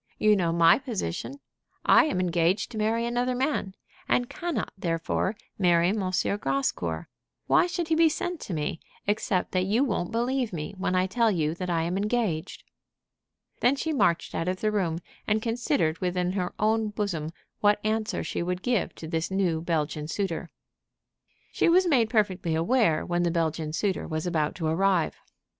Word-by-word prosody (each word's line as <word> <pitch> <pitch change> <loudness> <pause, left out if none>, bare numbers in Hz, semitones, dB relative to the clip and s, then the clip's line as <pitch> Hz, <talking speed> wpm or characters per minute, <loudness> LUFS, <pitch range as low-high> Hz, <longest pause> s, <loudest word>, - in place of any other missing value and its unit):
You 215 0 +4
know 175 -4 +1
my 165 +4 +5
position. 255 - -4 0.5
I - - +7
am 245 -12 -1
engaged 180 +4 +1
to 225 - -6
marry 225 +2 +1
another 245 +1 0
man, 255 -7 -1 0.3
and 245 - +2
cannot 345 -2 -3
therefore 170 +3 -1 0.2
marry 175 -2 +4
M. 210 - 0 0.4
Grascour. 135 - -1 0.4
Why - - +4
should 345 -2 -3
he - - +3
be 325 0 +5
sent 350 +2 -3
to 190 - -6
me, 150 +1 -2 0.3
except 205 -2 0
that 185 0 +1
you 220 +7 +2
won't 200 -8 -1
believe 240 0 0
me 155 +2 -4
when 185 -1 0
I 185 0 +3
tell 225 +4 +2
you 160 -6 0
that 180 +1 -5
I 165 -2 +1
am 175 +3 -1
engaged?" 205 -5 -1 1.0
Then 250 +3 +3
she 315 +3 -2
marched 170 - +1
out 165 - -2
of 185 0 -2
the 215 - +1
room, 180 -6 0 0.3
and 215 0 +2
considered 230 - 0
within 180 0 0
her 185 -2 -2
own 220 +1 +2
bosom 200 -7 -2 0.3
what 205 0 +3
answer 215 0 -1
she - - -3
would 180 +1 -2
give 245 -6 0
to 160 - -8
this 160 0 -2
new 185 -4 0
Belgian 155 -3 -1
suitor. 170 -1 -3 1.0
She - - +2
was 365 +2 +5
made 250 -10 +3
perfectly 190 -7 +1
aware 170 -1 +2
when 175 0 0
the 175 - +2
Belgian 160 -2 -1
suitor 190 +4 -1
was 155 0 -3
about 155 -4 0
to 165 - -4
arrive. 175 +1 +2
190 Hz, 175 wpm, -27 LUFS, 165-225 Hz, 1.0 s, I